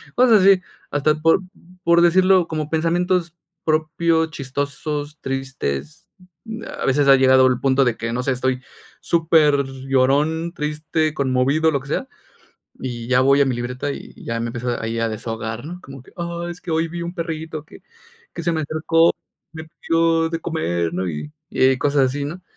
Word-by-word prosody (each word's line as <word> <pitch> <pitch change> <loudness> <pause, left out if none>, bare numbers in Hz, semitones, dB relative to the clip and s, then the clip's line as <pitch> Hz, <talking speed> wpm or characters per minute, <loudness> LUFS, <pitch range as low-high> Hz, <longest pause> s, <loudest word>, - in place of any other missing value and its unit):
Cosas 240 -5 +5
así, 190 -1 +6 0.3
hasta 150 +1 +2
por 165 +4 +4 0.4
por 170 0 +4
decirlo 185 +1 +4
como 155 -2 -3
pensamientos 170 +1 0 0.3
propios, 160 +1 +1
chistosos, 145 +2 -4
tristes. 135 - -4 0.7
A - - -2
veces 140 +1 +2
ha 135 - +9
llegado 130 0 +5
el 125 -1 +1
punto 135 0 +3
de 120 -3 0
que, 115 0 -3
no 125 +1 -2
sé, 135 - 0
estoy 130 0 -1 0.4
superllorón, 145 0 +2
triste, 155 +1 -1
conmovido, 140 +3 +2
lo 140 -3 -1
que 135 - -13
sea, 260 - -2 0.7
y 120 -2 -5
ya 125 0 +4
voy 140 +1 +4
a 140 - +4
mi 125 -2 -1
libreta, 125 +3 -3
y - - -7
ya 115 0 -3
me 115 0 -2
empiezo 120 0 -3
ahí 115 0 -3
a 115 - +1
desahogar, 110 +1 -5
¿no?, 175 +4 -7
como 135 -5 -11
que: - - -19
"Ah, 170 0 -4
es 175 - -9
que 175 - -7
hoy 160 +1 +1
vi 170 +1 -6
un 170 +1 -5
perrito 160 -3 -5
que - - -16 0.5
que - - -5
se 170 +1 0
me 160 - -1
acercó, 155 +2 +2 0.4
me 160 -1 -8
pidió 165 0 +1
de 165 0 -3
comer", 85 - -2
¿no?, 90 +1 -2
y 85 - -6 0.2
eh 130 0 +4
y 130 - -2
cosas 140 -1 +2
así, 140 +2 -3
¿no? 175 +5 -7
150 Hz, 180 wpm, -21 LUFS, 130-165 Hz, 0.7 s, ha